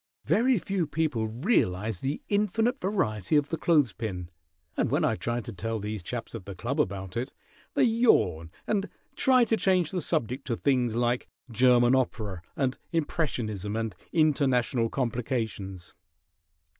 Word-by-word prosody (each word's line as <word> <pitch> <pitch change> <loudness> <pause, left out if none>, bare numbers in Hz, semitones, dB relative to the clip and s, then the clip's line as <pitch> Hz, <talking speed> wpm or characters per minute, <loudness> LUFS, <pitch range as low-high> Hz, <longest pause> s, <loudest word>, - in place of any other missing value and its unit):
Very 245 +3 +3
few 190 -3 -1
people 145 -8 0
realize 110 - 0
the 135 +2 -3
infinite 220 +5 +1
variety 130 - 0
of 145 -1 +3
the 165 - -2
clothes 150 -9 +3
pin, 90 -6 -5 0.4
and - - +1
when - - +2
I - - +2
try 120 +6 -2
to 120 0 -8
tell 115 +4 -3
these 105 -1 -4
chaps 115 +6 -5
at 90 - -7
the 100 - -7
club 125 - 0
about 95 -3 -4
it 125 +4 -2 0.4
they 280 - +4
yawn 220 - +3 0.2
and 205 -1 0 0.3
try 255 -2 +4
to 225 - +2
change 185 -6 +2
the 180 - -1
subject 130 0 -2
to 120 - 0
things 125 -3 +1
like 120 +1 0 0.2
German 120 +1 +5
opera 110 -8 -1
and 130 -2 -1
impressionism 115 - -1
and 110 -2 -2 0.2
international 130 -6 +2
complications." 110 -7 -3
125 Hz, 150 wpm, -28 LUFS, 110-160 Hz, 0.4 s, German